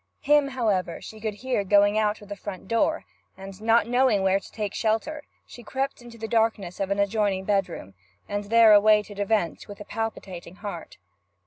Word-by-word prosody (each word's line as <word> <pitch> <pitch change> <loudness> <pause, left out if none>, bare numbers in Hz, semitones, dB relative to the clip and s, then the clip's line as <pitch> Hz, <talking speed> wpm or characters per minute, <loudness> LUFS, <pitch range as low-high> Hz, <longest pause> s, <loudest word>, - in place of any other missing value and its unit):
Him, 295 -1 +4
however, 215 -10 -1
she 220 - -11
could 215 -2 -3
hear 250 -1 -2
going 205 +1 +4
out 215 -1 0
of - - -13
the 205 - -5
front 195 -1 -8
door, 230 +9 0 0.3
and, 195 +1 -10
not 225 0 +3
knowing 245 -4 +2
where 190 0 +3
to - - -15
take 210 -2 -4
shelter, 225 +8 -1 0.2
she 240 - -12
crept 270 +3 -3
into 240 -1 -12
the 225 0 -5
darkness 220 -6 0
of 195 -1 -1
an 200 - 0
adjoining 200 -1 0
bedroom, 190 - -2 0.3
and 205 0 -3
there 225 0 +6
awaited 210 -1 +4
events 205 -5 -1
with 205 - -10
a 205 - -9
palpitating 195 -5 -6
heart. 200 -5 -8
210 Hz, 185 wpm, -25 LUFS, 195-225 Hz, 0.3 s, there